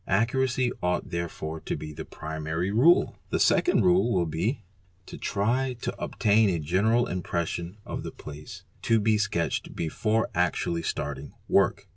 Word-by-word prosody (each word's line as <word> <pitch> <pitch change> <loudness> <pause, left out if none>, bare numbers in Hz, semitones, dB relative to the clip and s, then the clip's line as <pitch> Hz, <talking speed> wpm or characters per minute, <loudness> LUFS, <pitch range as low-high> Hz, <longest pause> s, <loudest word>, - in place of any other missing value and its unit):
Accuracy 125 +4 +1
ought 90 0 -1
therefore 80 -2 -4
to - - -4
be 75 0 -7
the - - -7
primary 80 +4 -3
rule. 140 +12 +4
The - - 0
second 360 - +4
rule 180 -8 +4
will 90 -4 +2
be 105 - -2 0.4
:—try 125 +9 -1
to - - -3
obtain 105 0 +3
a 90 - +1
general 100 +10 +2
impression 85 -1 -3
of - - -4
the - - -5
place 75 0 -10 0.2
to 115 - +3
the 110 0 +2
sketched 85 -5 -1
before 110 +7 0
actually 85 -1 0
starting 70 -3 -4
work. - - +2
95 Hz, 145 wpm, -27 LUFS, 85-115 Hz, 0.4 s, rule